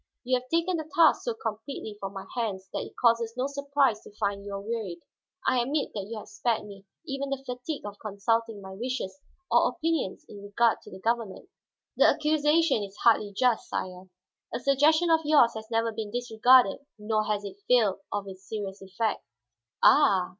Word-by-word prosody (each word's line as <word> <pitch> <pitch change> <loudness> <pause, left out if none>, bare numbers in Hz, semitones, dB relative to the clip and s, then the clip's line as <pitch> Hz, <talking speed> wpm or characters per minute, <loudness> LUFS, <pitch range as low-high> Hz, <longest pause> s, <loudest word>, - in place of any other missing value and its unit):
You 255 0 +2
have 255 +1 -19
taken 335 +2 +1
the 315 -1 -6
task 330 -2 +5
so 480 -2 -3
completely 220 - -5
from 195 -1 -5
my 195 -1 -7
hands 200 -6 -3
that - - -2
it - - -9
causes 230 -1 +2
no 255 - 0
surprise 280 -5 +1
to - - -13
find 200 -2 -2
you 200 0 -7
are - - -4
wearied. 210 -4 -4 0.5
I 255 -1 +3
admit 280 +5 -1
that 200 -2 -5
you 230 - -5
have 215 - -9
spared 240 - -1
me 200 -1 -12 0.2
even 275 -2 -3
the 275 -1 -3
fatigue 250 +3 -5
of 205 0 -8
consulting 220 0 -1
my 190 - -9
wishes 245 +1 -4 0.3
or - - +5
opinions 320 - -2
in 205 - -11
regard 210 +3 +1
to - - -13
the 190 - -10
government." 225 -1 -2 0.5
"The - - +6
accusation 305 -2 +3
is 200 0 -7
hardly 215 -3 +3
just, 240 +3 +1
sire. 185 0 -5 0.4
A - - -3
suggestion 305 +6 +3
of 325 - +5
yours 295 -6 +5
has 220 0 -8
never 225 0 +1
been 220 -1 -5
disregarded 245 -1 +4 0.2
nor 215 0 0
has 210 -1 -1
it 200 0 -9
failed 220 -6 +3
of 205 -1 -3
its 190 0 -10
serious 200 -3 -5
effect." 195 +3 -2 0.6
"Ah?" 195 -11 +5
230 Hz, 190 wpm, -27 LUFS, 205-275 Hz, 0.6 s, The